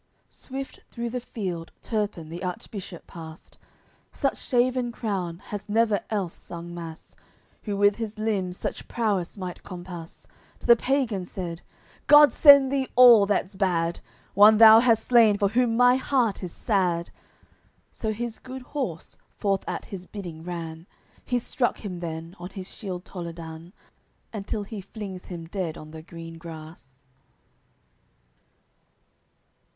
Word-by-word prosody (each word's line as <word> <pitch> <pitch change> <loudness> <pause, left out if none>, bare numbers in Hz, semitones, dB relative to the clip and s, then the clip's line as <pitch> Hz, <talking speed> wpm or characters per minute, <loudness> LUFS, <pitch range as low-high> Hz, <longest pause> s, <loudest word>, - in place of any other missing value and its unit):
CXIX - - -37
Swift 270 0 -7
through 235 -1 -4
the 250 - -2
field 185 -9 -5
Turpin 210 -8 -2
the 170 +2 -7
Archbishop 180 0 -6
passed; 160 -1 -11 0.5
Such 275 - -1
shaven 250 0 +1
crown 190 -8 -3
has 205 +3 -8
never 220 -1 +3
else 195 -6 -1
sung 170 0 -8
Mass 165 -2 -9 0.5
Who 205 -2 -3
with 205 0 +4
his 220 -2 -5
limbs 195 -4 -1
such - - -5
prowess 205 -6 -1
might 185 -2 -6
compass; 175 -2 -9 0.4
To - - -11
th'pagan 235 -4 +3
said 170 -3 -6 0.5
"God 295 0 +8
send 280 -3 +8
thee 270 -2 0
all 235 -5 +8
that's 200 -1 0
bad! 175 -4 0 0.3
One 210 +2 +8
thou 220 0 +10
hast 230 -2 +3
slain 230 -4 +5
for 200 -1 +2
whom 230 +1 +2
my 245 +1 +6
heart 250 -6 +1
is 180 -3 -5
sad." 180 -6 0 0.8
So 220 - -3
his 230 +1 -4
good 260 0 -8
horse 250 - -5 0.2
forth 195 -2 0
at - - -4
his 185 -2 -8
bidding 175 -6 -8
ran, 165 -1 -6 0.4
He's 245 -2 -1
struck 245 - 0
him 180 -3 -5
then 165 +1 -6
on 175 +1 -7
his 190 -1 -8
shield 185 -4 -6
Toledan, 170 -1 -8 0.6
Until 210 0 -3
he 205 0 -7
flings 195 -2 -8
him 170 -2 -7
dead 170 -2 -4
on 155 0 -11
the 160 0 -9
green 165 0 -10
grass. 155 -5 -11
195 Hz, 140 wpm, -26 LUFS, 170-230 Hz, 0.8 s, thou